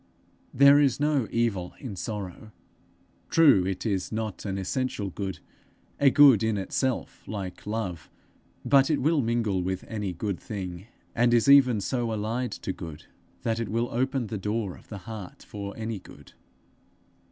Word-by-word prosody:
There 140 +2 +7
is 140 -3 +2
no 145 -5 +1
evil 105 -7 -1
in 120 -8 -7
sorrow. 105 +1 -6 0.8
True, 140 - +5
it 95 +2 -3
is 100 -4 -1
not 110 -2 -4
an 95 -1 -2
essential 100 0 -2
good, 95 -1 -4 0.6
a 140 - +6
good 140 -6 +7
in 110 -2 +1
itself, 125 +6 -2
like 100 -3 -6
love; 95 -8 -4 0.6
but 135 +1 +5
it 155 - +2
will 155 +2 +2
mingle 115 -5 0
with 95 +1 -3
any 105 -4 -3
good 95 +2 -3
thing, 95 -2 -6 0.3
and 120 0 +3
is 115 - +3
even 130 -6 +6
so 120 +2 -1
allied 110 +4 -2
to 95 - -2
good 80 -4 -9 0.4
that 115 0 0
it 115 -4 -3
will 115 +3 0
open 130 +1 0
the 110 -1 -5
door 105 -1 -2
of - - -18
the 105 - -7
heart 110 -5 -8
for 100 -1 -6
any 110 -2 -4
good. - - -15
110 Hz, 160 wpm, -27 LUFS, 95-125 Hz, 0.8 s, There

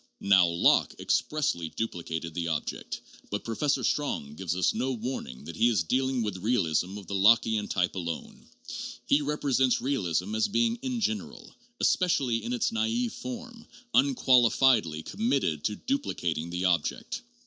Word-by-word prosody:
Now 95 -3 +5
Locke 85 0 +3
expressly 140 - 0
duplicated 85 -6 -4
the 85 0 -2
object; 80 -3 -3 0.3
but 105 - -3
Professor 140 +5 0
Strong 135 - -1
gives 85 +1 -3
us 90 -1 +2
no 130 +4 -1
warning 115 - -5
that 85 - -8
he 115 +7 +4
is 105 -7 +1
dealing 130 +5 0
with 105 -3 -3
realism 95 -3 0
of 100 - -9
the 100 - -7
Lockean 105 +1 +4
type 90 -2 0
alone; 85 -3 -6 0.6
he 145 - +3
represents 140 -3 +1
realism 105 - -1
as 110 - +2
being 230 +3 +1
in 250 -1 -3
general, 220 +2 -3 0.3
especially 135 -11 +2
in 115 - -4
its 125 - 0
naive 230 +1 0
form, 245 -2 -8 0.3
unqualifiedly 125 - +4
committed 135 - 0
to 105 - 0
duplicating 85 - -2
the 90 +2 -2
object. 90 - 0
115 Hz, 145 wpm, -28 LUFS, -, 0.6 s, Now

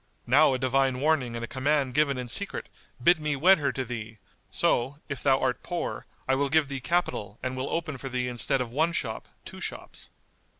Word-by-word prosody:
Now 135 +2 +5
a - - 0
divine 130 0 +1
warning 135 -5 +1
and 115 0 -3
a - - -12
command 135 0 0
given 140 -1 +2
in 125 -1 -4
secret 120 - -1 0.3
bid 175 +2 +6
me 150 -1 -1
wed 180 +7 +6
her 145 - +1
to 130 - -2
thee; 115 -2 -6 0.3
so, 130 +4 +1
if 140 - -4
thou 135 -1 +4
art 130 -1 0
poor, 175 -1 -4 0.2
I 130 - +3
will 140 +1 +1
give 150 -1 +3
thee 135 -1 -3
capital 125 - -1
and 130 0 -2
will 130 +1 -3
open 155 -5 -2
for 135 - -5
thee 125 -1 -1
instead 125 +2 0
of 120 -2 -4
one 160 +6 +1
shop 110 -8 -3 0.2
two - - -9
shops." - - -6
135 Hz, 210 wpm, -27 LUFS, 125-150 Hz, 0.3 s, bid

